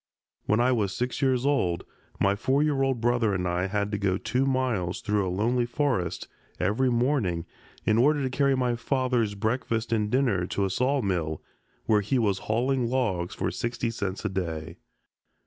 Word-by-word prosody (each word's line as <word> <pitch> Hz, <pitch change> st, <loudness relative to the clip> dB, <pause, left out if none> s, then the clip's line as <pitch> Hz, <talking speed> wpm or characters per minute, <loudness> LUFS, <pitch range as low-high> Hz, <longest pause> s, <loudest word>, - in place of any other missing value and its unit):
When 105 Hz, -, +3 dB
I 125 Hz, +2 st, +3 dB
was 105 Hz, -6 st, 0 dB
six 125 Hz, +1 st, -2 dB
years 130 Hz, -2 st, +2 dB
old 95 Hz, -12 st, +1 dB, 0.4 s
my 100 Hz, 0 st, +3 dB
four 130 Hz, +7 st, +1 dB
year 145 Hz, -3 st, +1 dB
old 135 Hz, -3 st, +1 dB
brother 115 Hz, -3 st, +2 dB
and 90 Hz, -1 st, -1 dB
I 90 Hz, +2 st, 0 dB
had 100 Hz, +1 st, -1 dB
to 105 Hz, -, -1 dB
go 95 Hz, -2 st, +1 dB
two 130 Hz, +7 st, 0 dB
miles 125 Hz, -10 st, 0 dB
through 105 Hz, -2 st, 0 dB
a -, -, -1 dB
lonely 120 Hz, +6 st, +1 dB
forest 120 Hz, -, -1 dB, 0.3 s
every 105 Hz, +8 st, +1 dB
morning 120 Hz, -, +1 dB, 0.4 s
in 110 Hz, +1 st, +3 dB
order 145 Hz, +3 st, +3 dB
to 130 Hz, -, 0 dB
carry 140 Hz, -1 st, +3 dB
my 125 Hz, -2 st, +1 dB
father's 120 Hz, -3 st, 0 dB
breakfast 115 Hz, +1 st, -1 dB
and 105 Hz, -2 st, +1 dB
dinner 115 Hz, -8 st, +1 dB
to 100 Hz, -, -1 dB
a 95 Hz, -, -2 dB
sawmill, 95 Hz, -, 0 dB, 0.4 s
where 105 Hz, -1 st, +3 dB
he 120 Hz, +7 st, 0 dB
was 100 Hz, -5 st, +1 dB
hauling 125 Hz, +2 st, +1 dB
logs 110 Hz, -9 st, -1 dB
for -, -, -1 dB
sixty 120 Hz, 0 st, -2 dB
cents 100 Hz, -2 st, -4 dB
a -, -, +1 dB
day. 80 Hz, -4 st, -4 dB
115 Hz, 180 wpm, -27 LUFS, 95-130 Hz, 0.4 s, When